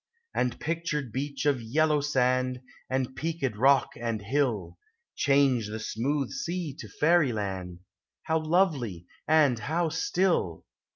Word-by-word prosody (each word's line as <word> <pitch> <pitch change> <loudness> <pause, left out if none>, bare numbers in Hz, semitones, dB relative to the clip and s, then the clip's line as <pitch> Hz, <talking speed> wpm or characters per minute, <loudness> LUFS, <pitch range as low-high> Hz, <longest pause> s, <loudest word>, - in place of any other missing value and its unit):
And 125 -1 -1
pictured 160 -5 -2
beach 140 +2 -3
of 140 -4 +2
yellow 150 +6 +2
sand, 130 -2 +1 0.3
And 130 0 -1
peaked 155 -7 -2
rock 135 +4 +4
and 115 -2 -2
hill, 120 +1 -1 0.4
Change 135 -5 +3
the 105 +1 -5
smooth 135 +6 -1
sea 180 - -3
to - - -8
fairyland; 105 - 0 0.4
How 160 0 +1
lovely 155 - +1 0.2
and 150 -6 +4
how 160 +7 0
still 170 - 0
135 Hz, 120 wpm, -28 LUFS, 120-155 Hz, 0.4 s, rock